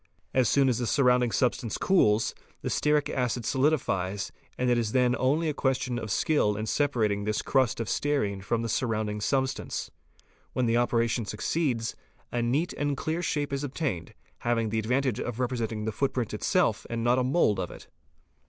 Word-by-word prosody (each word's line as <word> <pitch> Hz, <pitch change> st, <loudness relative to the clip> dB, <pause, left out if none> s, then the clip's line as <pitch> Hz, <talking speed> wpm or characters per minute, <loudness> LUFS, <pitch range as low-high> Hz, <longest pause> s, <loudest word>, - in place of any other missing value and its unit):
As 130 Hz, -4 st, +3 dB
soon 140 Hz, -1 st, +4 dB
as 125 Hz, -2 st, +1 dB
the 120 Hz, -, -1 dB
surrounding 125 Hz, -3 st, +3 dB
substance 120 Hz, -2 st, 0 dB
cools, 110 Hz, -, +3 dB, 0.3 s
the -, -, -1 dB
stearic 150 Hz, -1 st, +2 dB
acid 125 Hz, -2 st, -1 dB
solidifies 105 Hz, -, 0 dB, 0.3 s
and 125 Hz, -, 0 dB
it 120 Hz, -, +4 dB
is 115 Hz, -2 st, -1 dB
then 125 Hz, -1 st, +3 dB
only 145 Hz, +6 st, +1 dB
a 155 Hz, -, 0 dB
question 130 Hz, -3 st, 0 dB
of 110 Hz, -2 st, -6 dB
skill 105 Hz, -2 st, +2 dB
in 110 Hz, -, -2 dB
separating 110 Hz, -6 st, +1 dB
this 105 Hz, +1 st, -1 dB
crust 130 Hz, -5 st, +2 dB
of 115 Hz, -, -2 dB
stearine 110 Hz, -11 st, 0 dB
from 115 Hz, +4 st, -1 dB
the -, -, -1 dB
surrounding 110 Hz, -2 st, -1 dB
substance. 130 Hz, +4 st, -1 dB, 0.6 s
When 125 Hz, -, +1 dB
the 115 Hz, 0 st, +2 dB
operation 120 Hz, -1 st, +1 dB
succeeds, 115 Hz, +2 st, -1 dB, 0.4 s
a 120 Hz, -, 0 dB
neat 140 Hz, +9 st, 0 dB
and 145 Hz, -1 st, -1 dB
clear 160 Hz, +5 st, -2 dB
shape 145 Hz, -4 st, -1 dB
is 140 Hz, +1 st, -2 dB
obtained, 135 Hz, -, -3 dB, 0.2 s
having 115 Hz, -2 st, 0 dB
the 110 Hz, +1 st, 0 dB
advantage 125 Hz, +2 st, 0 dB
of 120 Hz, -1 st, -4 dB
representing 115 Hz, -4 st, -2 dB
the 110 Hz, -, -1 dB
footprint 125 Hz, -1 st, -1 dB
itself -, -, +1 dB
and 115 Hz, -1 st, -2 dB
not 120 Hz, +2 st, +3 dB
a -, -, +2 dB
mould 130 Hz, -5 st, +2 dB
of -, -, -2 dB
it. -, -, -12 dB
120 Hz, 180 wpm, -28 LUFS, 110-135 Hz, 0.6 s, soon